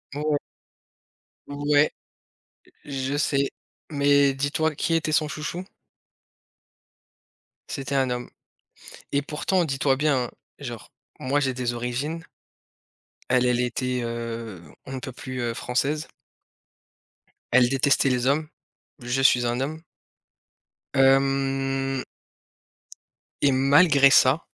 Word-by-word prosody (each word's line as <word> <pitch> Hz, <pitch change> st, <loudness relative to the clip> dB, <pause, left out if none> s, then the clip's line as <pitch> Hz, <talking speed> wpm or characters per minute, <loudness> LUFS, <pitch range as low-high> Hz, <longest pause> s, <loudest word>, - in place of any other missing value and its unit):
Oh 145 Hz, -, -3 dB
ouais. 145 Hz, -, +3 dB, 1.1 s
Ouais, 145 Hz, +1 st, +2 dB, 0.9 s
je 135 Hz, 0 st, -3 dB
sais, 140 Hz, -2 st, +1 dB, 0.4 s
mais 140 Hz, -1 st, +4 dB
dis-toi, 145 Hz, +3 st, 0 dB
qui 165 Hz, -, -1 dB
était 160 Hz, -1 st, 0 dB
son 155 Hz, 0 st, +2 dB
chouchou? 155 Hz, +4 st, -5 dB, 2.0 s
C'était 135 Hz, +1 st, -4 dB
un 130 Hz, -2 st, +2 dB
homme 125 Hz, 0 st, -4 dB, 0.8 s
et 140 Hz, -, +1 dB
pourtant, 170 Hz, +5 st, 0 dB
dis-toi 135 Hz, -2 st, +1 dB
bien, 140 Hz, -3 st, +1 dB
hein, -, -, -9 dB, 0.3 s
genre, -, -, -8 dB, 0.3 s
moi, 135 Hz, +3 st, 0 dB
j'ai 135 Hz, -2 st, 0 dB
des 125 Hz, -1 st, -2 dB
origines. 130 Hz, +8 st, -3 dB, 1.1 s
Elle, 125 Hz, 0 st, +3 dB
elle 125 Hz, 0 st, +2 dB
était, 125 Hz, 0 st, -1 dB
heu, 115 Hz, -5 st, -5 dB, 0.2 s
on 135 Hz, -, -8 dB
ne 130 Hz, -, -4 dB
peut 130 Hz, -, -7 dB
plus, 130 Hz, 0 st, -6 dB
heu, 120 Hz, -1 st, -1 dB
française. 140 Hz, +6 st, -1 dB, 1.4 s
Elle 125 Hz, 0 st, +5 dB
détestait 135 Hz, +1 st, +2 dB
les 125 Hz, -1 st, 0 dB
hommes, 150 Hz, +3 st, +1 dB, 0.5 s
je 120 Hz, +2 st, -1 dB
suis 125 Hz, -2 st, +4 dB
un 120 Hz, +2 st, -1 dB
homme 155 Hz, +4 st, -4 dB, 1.1 s
hem 135 Hz, 0 st, +2 dB, 1.4 s
et 140 Hz, -, +4 dB
malgré 140 Hz, +1 st, +5 dB
ça. 135 Hz, +3 st, +5 dB
135 Hz, 110 wpm, -25 LUFS, 125-145 Hz, 2.0 s, Elle